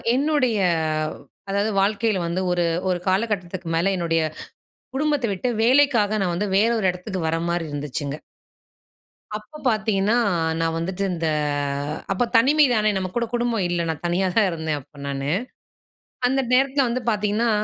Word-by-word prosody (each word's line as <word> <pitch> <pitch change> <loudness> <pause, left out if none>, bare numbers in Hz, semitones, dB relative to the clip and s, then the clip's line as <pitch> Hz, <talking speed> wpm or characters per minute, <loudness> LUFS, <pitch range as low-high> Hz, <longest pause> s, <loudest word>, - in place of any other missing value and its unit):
என்னுடைய 275 -5 +2 0.6
வ் - - -13 0.3
அதாவது 200 +2 0
வாழ்க்கைல 210 0 +1
வந்து 175 +2 -1
ஒரு 175 -1 +1 0.3
ஒரு 180 - 0
காலகட்டத்துக்கு 185 -3 -1
மேல 175 +4 +2
என்னுடைய 165 -2 +1 0.7
குடும்பத்த 295 -2 +1
விட்டு 195 +6 -3 0.2
வேலைக்காக 235 -5 +4
நான் 180 -2 0
வந்து 205 +3 -1
வேறு 225 +4 +3
ஒரு 195 - -1
இடத்துக்கு 180 +1 -6
வர 165 - 0
மாரி 170 -1 -1
இருந்துச்சுங்க. 145 0 -4 1.2
அப்போ 215 +8 -11
பாத்தீங்கன்னா, 215 -2 +1 0.5
நான் 165 0 0
வந்துட்டு 180 +4 -3
இந்த 165 -2 -2 0.9
அப்போ 195 +5 +1
தனிமை 290 +7 +5
தானே, 215 -1 +2
நம்ம 190 -1 -1
கூட 240 - +2
குடும்பம் 235 -4 0
இல்ல. 175 -1 0
நான் 160 -2 -3
தனியா 180 +2 +1
தான் 220 -3 +5
இருந்தேன், 160 -3 -2
அப்ப 145 +2 -19
நானு. 140 0 -2 1.0
அந்த 265 +2 +1
நேரத்தில, 270 +1 +3
வந்து 240 +2 -1
பாத்தீங்கன்னா 210 +2 +1
200 Hz, 145 wpm, -23 LUFS, 175-235 Hz, 1.2 s, தனிமை